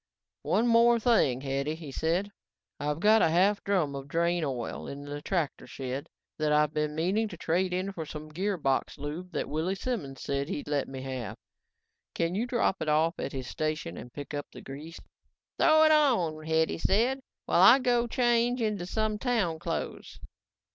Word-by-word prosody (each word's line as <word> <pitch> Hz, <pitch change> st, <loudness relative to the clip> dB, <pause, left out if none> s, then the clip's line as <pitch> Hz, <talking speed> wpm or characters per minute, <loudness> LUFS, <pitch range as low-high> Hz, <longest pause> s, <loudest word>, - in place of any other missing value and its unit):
"One 225 Hz, -, +1 dB
more 235 Hz, 0 st, +5 dB
thing, 210 Hz, -, +3 dB
Hetty," 140 Hz, +2 st, -2 dB
he 160 Hz, -4 st, -9 dB
said. 175 Hz, +8 st, -1 dB, 0.5 s
"I've 150 Hz, +1 st, -2 dB
got 215 Hz, +4 st, +5 dB
a -, -, +4 dB
half 190 Hz, +5 st, +3 dB
drum 180 Hz, -8 st, +1 dB
of 135 Hz, 0 st, -6 dB
drain 170 Hz, +3 st, +1 dB
oil 130 Hz, -5 st, -4 dB
in 140 Hz, +1 st, -7 dB
the 145 Hz, 0 st, -6 dB
tractor 165 Hz, -4 st, -2 dB
shed 135 Hz, +3 st, -5 dB, 0.3 s
that 155 Hz, -1 st, +1 dB
I've 150 Hz, 0 st, +3 dB
been 150 Hz, 0 st, -1 dB
meaning 190 Hz, +8 st, +1 dB
to 180 Hz, -5 st, -9 dB
trade 180 Hz, +3 st, 0 dB
in 185 Hz, +2 st, -1 dB
for 160 Hz, -5 st, -6 dB
some 155 Hz, 0 st, -8 dB
gearbox 175 Hz, -6 st, -1 dB
lube 155 Hz, +6 st, -6 dB
that -, -, -2 dB
Willy 160 Hz, +6 st, -1 dB
Simons 195 Hz, -, -4 dB
said 140 Hz, +1 st, -2 dB
he'd 145 Hz, -, -4 dB
let 145 Hz, -2 st, 0 dB
me 130 Hz, -1 st, -7 dB
have. 125 Hz, -6 st, -5 dB, 0.8 s
Can 170 Hz, +1 st, 0 dB
you 220 Hz, +6 st, -1 dB
drop 240 Hz, -6 st, +1 dB
it 155 Hz, -, -1 dB
off 160 Hz, +3 st, +2 dB
at -, -, -3 dB
his 130 Hz, -2 st, -5 dB
station 155 Hz, -, -3 dB
and 125 Hz, -, -9 dB
pick 145 Hz, +2 st, -8 dB
up 145 Hz, 0 st, -4 dB
the -, -, -11 dB
grease?" 150 Hz, +5 st, -9 dB, 0.6 s
"Throw 315 Hz, 0 st, +6 dB
it 310 Hz, -, +6 dB
on," 180 Hz, -, +2 dB
Hetty 160 Hz, +1 st, +1 dB
said, 240 Hz, +10 st, +2 dB, 0.3 s
"while 175 Hz, -, +3 dB
I 225 Hz, +7 st, +9 dB
go 245 Hz, -2 st, +1 dB
change 240 Hz, 0 st, +2 dB
into 210 Hz, -6 st, -1 dB
some 215 Hz, +1 st, -1 dB
town 215 Hz, -11 st, 0 dB
clothes." -, -, -5 dB
165 Hz, 180 wpm, -29 LUFS, 145-210 Hz, 0.8 s, I